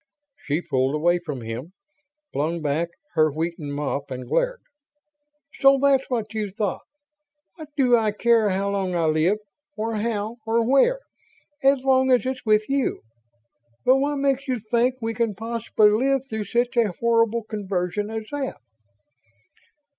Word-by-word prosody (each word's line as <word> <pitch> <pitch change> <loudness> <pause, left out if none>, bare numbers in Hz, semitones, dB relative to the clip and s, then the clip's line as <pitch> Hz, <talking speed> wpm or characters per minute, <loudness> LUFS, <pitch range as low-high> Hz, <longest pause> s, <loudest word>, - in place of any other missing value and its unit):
She 150 +4 -1
pulled 135 0 0
away 175 +3 +2
from 150 -7 -6
him, 115 +10 -6 0.6
flung 160 +4 -1
back 155 +2 -1 0.2
her 155 -1 +4
wheaten 160 -1 -4
mop 145 0 -3
and 130 -1 -6
glared. - - 0 1.0
"So 275 0 +6
that's 275 -1 +3
what 225 -4 -2
you 215 -2 -2
thought! 200 0 -3 0.8
What 310 -3 -10
do 250 -3 +5
I 220 -2 +2
care 225 0 +3
how 195 +1 -1
long 190 -2 -1
I 170 -1 +1
live, 160 +6 +2 0.4
or 220 +1 -2
how, 220 +1 -2
or 225 +1 +1
where, 475 - +3 0.6
as 270 -1 +4
long 265 -1 +3
as 250 0 +3
it's 260 0 -3
with 215 -1 +2
you? 275 -1 0 0.8
But 260 - +6
what 285 +2 0
makes 275 0 0
you 255 -1 0
think 235 +3 +1
we 225 0 -1
can 225 -2 -1
possibly 225 -1 +2
live 265 +5 +2
through 220 -4 -4
such 240 +5 0
a 220 -6 +3
horrible 230 0 +2
conversion 200 -1 -3
as 220 0 -4
that?" 285 -2 -3
220 Hz, 155 wpm, -24 LUFS, 175-255 Hz, 1.0 s, So